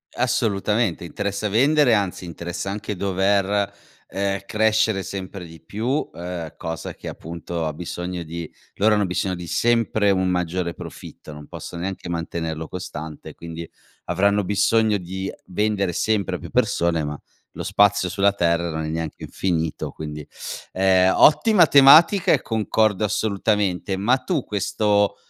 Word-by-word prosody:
Assolutamente, 115 -6 0
interessa 100 +4 -3
vendere, 140 +4 +4
anzi 100 -3 0
interessa 85 +2 -5
anche 105 0 -4
dover, 100 +1 +1 0.4
ehm, 100 0 -1
crescere 110 -1 +2
sempre 95 -1 -6
di 80 -1 -13
più, 115 - -2
ehm, 85 -2 -6
cosa 80 0 -5
che - - -7
appunto 85 0 -5
ha 75 - -3
bisogno 90 +1 -5
di 85 0 -7 0.2
loro 105 +2 +3
hanno 105 -1 +2
bisogno 90 0 -1
di 85 0 -8
sempre 115 -1 +2
un 95 -1 +1
maggiore 90 -1 -1
profitto, 75 - -10
non 75 0 -11
possono 85 - -8
neanche 95 0 -4
mantenerlo 80 -1 -3
costante, 80 -4 -7
quindi, 85 0 -8 0.4
avranno 100 +3 +2
bisogno 105 +2 +2
di 95 +1 -5 0.2
vendere 100 0 0
sempre 105 +3 0
a - - -15
più - - -9
persone 85 -2 +1
ma 75 0 -4 0.3
lo - - -7
spazio 100 0 +3
sulla 100 +2 +2
terra 85 -3 +1
non 80 0 -3
è - - -3
neanche 80 0 -4
infinito, 80 -4 -2
quindi 75 -1 -7 0.5
ehm. 95 0 +4
Ottima 180 +2 +6
tematica 155 +8 +7
e 140 - +3
concordo 110 -2 +1
assolutamente, 100 -2 0
ma 110 +7 +3
tu 160 -5 -2
questo 105 0 +1
95 Hz, 140 wpm, -22 LUFS, 85-105 Hz, 0.5 s, tematica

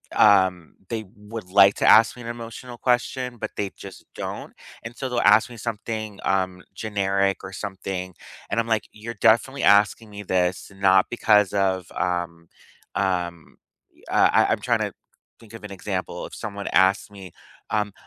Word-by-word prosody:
um, 95 -5 +4
they 110 -1 -3
would 105 -2 -9
like 100 0 +7
to - - -1
ask 115 +1 +7
me 125 - -11
an 115 - -6
emotional 120 +1 -8
question, 125 0 -1
but - - -5
they 100 -2 -2
just - - -11
don't. - - -6 0.3
And 115 +2 -8
so 130 - -4
they'll 120 -1 -1 0.2
ask 110 - 0
me 120 - -11
something, 110 -1 -5
um, 95 -1 -1
generic 100 -2 0
or 95 - -7
something. 95 -1 -5 0.4
And 115 - 0
I'm 115 - -7
like, 110 -2 0
you're 115 +2 -8
definitely 135 +5 +3
asking 105 +2 +4
me 105 0 -8
this 90 0 -1
not 95 -1 +4
because 105 -4 +3
of, 95 -2 0
um, 85 -1 -3 0.5
um, 90 -4 -2 0.4
e - - -25
uh, - - +4
I - - +5
I'm - - +2
tryna - - 0 0.5
think 115 -1 -16
of 115 - -10
an 105 - -7
example. 95 - -4
If - - -11
someone 100 -1 -6
asked 95 +2 +3
me, 95 -2 -11 0.4
um, 105 -1 0
100 Hz, 170 wpm, -24 LUFS, 95-115 Hz, 0.5 s, like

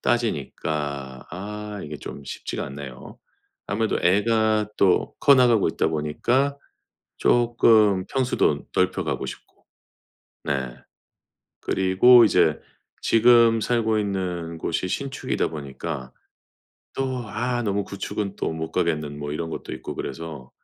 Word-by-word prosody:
따지니까 70 - -2
아 105 +3 -6
이게 75 0 -6
좀 70 - -8
쉽지가 - - -5
않네요. 70 -2 -9 0.5
아무래도 110 +2 0
애가 110 +2 +2
또 95 -2 +3
커 140 - +7
나가고 120 -7 +4
있다 80 - 0
보니까 120 - 0 0.6
쪼끔 110 -5 +4
평수도 125 - 0
넓혀 - - +1
가고 - - -2
싶고 - - -11 0.8
네. 65 -3 -2 0.9
그리고 95 +6 +5
이제 85 -7 +3 0.4
지금 115 0 +5
살고 110 -2 +1
있는 90 -5 -3
곳이 85 +3 -2
신축이다 135 +7 -2
보니까 70 -2 -6 0.9
또 130 -2 -2
아 120 +3 -1
너무 100 -1 -1
구축은 100 0 -4
또 - - -2
못 80 0 -5
가겠는 75 -5 -1
뭐 75 0 -5
이런 80 +2 -3
것도 - - -6
있고 - - -7
그래서 80 -6 -6
95 Hz, 245 characters per minute, -24 LUFS, 75-115 Hz, 0.9 s, 커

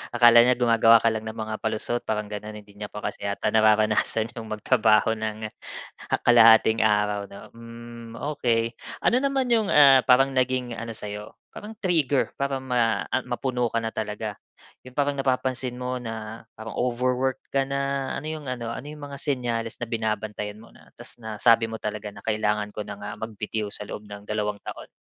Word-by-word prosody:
Akala 120 0 +8
niya 125 +1 +4
gumagawa 115 -1 +5
ka 115 - +4
lang 110 0 -4
ng 110 - -5
mga 110 0 -4
palusot, 110 +2 -2
parang 105 -1 -2
gano'n. 105 +1 -6
Hindi 100 0 -19
niya 105 - -4
pa 105 - -9
kasi 100 - -4
yata 100 - -1
nararanasan 110 +1 +3
'yong 115 -2 -8
magtrabaho 110 0 +3
nang 110 -1 -4 0.7
kalahating 115 -2 +6
araw, 105 -1 +1
'no? 100 - -12
Hmm, 115 0 -11
okey. 115 -5 0 0.3
Ano 245 - +4
naman 270 -2 0
'yong, 220 -4 +3
ah, 135 -3 +7
parang 135 +2 +5
naging 130 -1 0
ano 115 -1 -6
sa 105 -1 -6
'yo, 105 +1 -8 0.2
parang 215 +2 -9
trigger 160 - +1
para 135 -1 -1
ma 120 -3 +1
a - - +2
mapuno 125 -1 -1
ka 115 0 -2
na 110 - -2
talaga? 105 -1 -4 0.5
'Yong 125 - -13
parang 145 -1 0
napapansin 130 -1 -1
mo 125 0 -3
na 110 -1 -7
parang 110 0 -7
overwork 125 +1 0
ka 135 -1 +1
na, 140 -1 -2
ano 135 - -5
'yong 155 -3 -5
ano, 120 -2 -4
ano 130 - -6
'yong 150 -1 -9
mga 140 -1 -7
senyales 120 -5 -1
na 115 - -5
binabantayan 110 -1 -3
mo - - -17
na - - -20
ta’s - - -10
nasabi 115 +1 +3
mo 115 - -6
talaga 105 -1 -5
na 105 - -10
kailangan 105 -1 0
ko 105 0 -6
na 100 - -6
nga 105 +1 -7
magbitiw 110 -1 -4
sa 100 - -3
loob 105 0 -8
ng 105 0 -9
dalawang 105 -1 -3
taon? - - -8
115 Hz, 185 wpm, -25 LUFS, 110-130 Hz, 0.7 s, Akala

